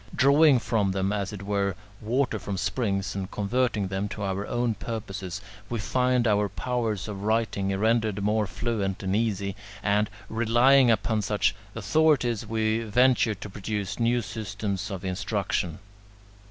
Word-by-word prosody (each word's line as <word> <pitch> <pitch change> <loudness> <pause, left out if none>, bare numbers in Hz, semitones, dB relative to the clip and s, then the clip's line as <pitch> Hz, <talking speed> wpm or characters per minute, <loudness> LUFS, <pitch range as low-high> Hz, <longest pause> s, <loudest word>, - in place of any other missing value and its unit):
Drawing 140 +1 +6
from 110 -5 0
them 95 +1 0
as 100 -1 -2
it 100 -2 -7
were 100 -1 0 0.3
water 120 +1 0
from 95 +1 -4
springs, 100 -3 -1
and 95 -1 -4
converting 105 -1 0
them 95 +2 -2
to 105 - -5
our 100 +1 -2
own 120 -1 0
purposes, 100 -3 -5 0.3
we 120 - -2
find 125 +4 +1
our 105 -1 +2
powers 115 -6 -2
of 100 -2 -6
writing 110 -2 0
rendered 110 -1 +1
more 105 0 +1
fluent 100 0 -2
and 95 +1 0
easy, 100 -3 -1 0.3
and, 105 +1 +2 0.2
relying 120 +4 +4
upon 110 -1 +2
such 105 0 +1 0.2
authorities, 120 0 +2
we 110 0 +1
venture 115 0 +3
to 100 +2 -8
produce 100 0 -4
new 120 +1 +2
systems 105 -1 -4
of 95 -2 -5
instruction. 95 -3 -2
105 Hz, 145 wpm, -26 LUFS, 100-115 Hz, 0.3 s, Drawing